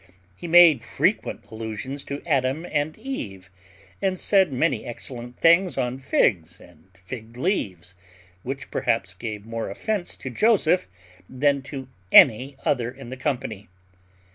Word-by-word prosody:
He 175 - -8
made 165 -6 +7
frequent - - -1
allusions 110 +5 -5
to 140 0 -6
Adam 140 0 0
and 150 -1 -2
Eve, 100 - -7 0.5
and 190 -2 0
said 190 -6 +3
many 130 -2 0
excellent 120 0 -8
things 170 +2 +4
on 125 +1 -2
figs 90 -9 +1
and 85 -3 -19
fig 110 +5 -10
leaves; 95 - -2 0.5
which 135 +3 -6
perhaps 115 -5 0
gave 105 +1 -6
more 115 -1 -4
offence 195 - -3
to 135 - -7
Joseph 185 - +3 0.4
than 140 +2 +1
to 135 -3 -6 0.2
any 130 +2 +6
other 120 -4 +1
in 130 -1 -11
the 130 - -6
company. 125 -7 -3
130 Hz, 135 wpm, -24 LUFS, 110-155 Hz, 0.5 s, made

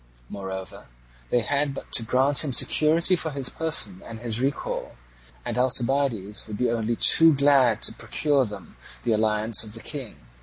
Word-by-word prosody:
Moreover, 95 -1 -8 0.4
they 120 - +1
had 140 +4 -2
but - - -10
to - - +4
grant 130 +6 +2
him 140 -4 -4
security 165 +7 +3
for 165 -2 -3
his 135 -3 -3
person 130 - +1
and 115 -1 -10
his 115 0 -3
recall, 135 +1 -4 0.5
and - - -3
Alcibiades 125 -5 +1
would 105 -1 -7
be 125 0 -1
only 115 0 -2
too 165 +5 +5
glad 135 -5 +2
to - - +2
procure 145 -3 -1
them 100 -6 -11 0.3
the 120 - -1
alliance 110 +1 +2
of 110 0 -7
the - - -5
King. 135 -3 -7
120 Hz, 165 wpm, -24 LUFS, 110-140 Hz, 0.5 s, too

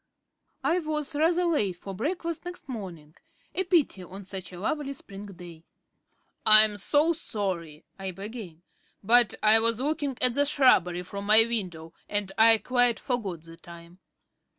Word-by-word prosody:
I 350 - +1
was 305 -2 -4
rather 335 +4 +2
late 215 - 0
for 195 +3 -9
breakfast 330 - -4
next 355 0 -9
morning; 180 - -8 0.4
a 380 - -1
pity 330 - +1
on 190 +3 -10
such 190 -1 -8
a 180 - -10
lovely 280 +7 -3
spring 205 -6 -11
day. 175 -4 -12 0.8
"I'm 215 -1 +6
so 295 - +2
sorry," 185 - -5
I 190 0 -4
began, 195 -3 -9 0.4
"but 235 +2 +4
I 215 +1 +6
was 230 0 +1
looking 285 -1 -2
at 250 -1 +3
the 285 +3 +2
shrubbery 190 - +3
from 200 +2 -7
my 215 +1 +7
window 180 -8 -4 0.2
and 205 -2 -2
I 225 0 +6
quite 245 +2 +1
forgot 200 -10 -4
the 165 0 -13
time." 170 +1 -14
215 Hz, 150 wpm, -26 LUFS, 185-275 Hz, 0.8 s, my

